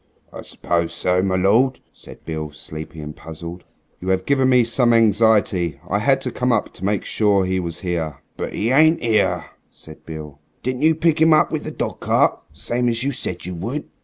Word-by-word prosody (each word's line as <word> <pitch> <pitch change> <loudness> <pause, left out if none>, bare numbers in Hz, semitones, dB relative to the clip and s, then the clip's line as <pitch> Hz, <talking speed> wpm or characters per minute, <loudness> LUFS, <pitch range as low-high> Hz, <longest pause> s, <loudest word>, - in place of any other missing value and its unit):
"I - - -7
suppose 85 -1 -2
so, 90 0 +1
my 95 -1 0
lord," 110 +8 +3
said - - -14
Beale, 80 -2 -4
sleepy 80 +1 -9
and 75 0 -8
puzzled. 85 +2 -9 0.3
"You 90 - -8
have 95 0 +1
given 135 -2 +2
me 125 -1 +5
some 120 +1 +2
anxiety. 105 -8 +3
I 100 - 0
had 135 +4 +3
to - - -3
come 125 0 0
up 115 -3 0
to - - -12
make 100 0 0
sure 100 -3 +2
he 95 0 0
was 85 -2 -4
here." 85 -5 -3 0.2
"But - - -5
'e 115 +4 0
ain't 155 +4 +5
'ere," 115 -2 +1 0.2
said 80 -1 -15
Beale. 75 -3 -9 0.2
"Didn't 130 +1 -2
you 160 +1 +4
pick 160 -1 +1
'im 160 0 +6
up 155 - +4
with - - -3
the - - -3
dog - - -4
cart, - - +2 0.2
same 120 +1 -1
as 115 0 -1
you 140 - 0
said 130 - -5
you 90 - -5
would?" 115 - -5
100 Hz, 205 wpm, -21 LUFS, 85-125 Hz, 0.3 s, im